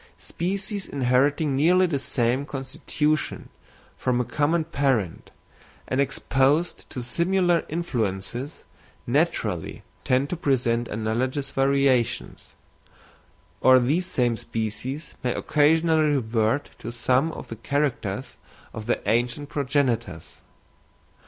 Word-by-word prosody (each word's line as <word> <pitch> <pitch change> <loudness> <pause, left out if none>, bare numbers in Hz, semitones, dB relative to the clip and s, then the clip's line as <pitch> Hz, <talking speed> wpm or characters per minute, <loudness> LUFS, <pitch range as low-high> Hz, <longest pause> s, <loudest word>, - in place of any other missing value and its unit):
Species 195 +3 -4
inheriting 140 +2 +2
nearly 180 +6 +4
the 155 -6 -1
same 125 0 0
constitution 145 +2 -2 0.5
from 125 -1 +1
a 125 - 0
common 155 +5 +1
parent, 135 - -1 0.6
and 130 +2 +1
exposed 140 +4 +1
to 125 - -5
similar 175 +5 +2
influences, 120 - -3 0.4
naturally - - -1 0.2
tend 130 +3 +1
to - - 0
present 120 -6 +1
analogous 125 +6 -2
variations, 135 -3 +1 1.1
or 130 0 +7
these 150 +9 +1
same 120 -6 +1
species 115 +8 -4
may 125 - 0
occasionally 155 0 +3
revert 115 +1 0
to 115 - -6
some 130 +6 +1
of - - -9
the 115 - -5
characters 130 -2 -2 0.4
of 110 0 -7
their - - 0
ancient 120 +5 0
progenitors. 125 - -1
135 Hz, 105 wpm, -25 LUFS, 120-150 Hz, 1.1 s, or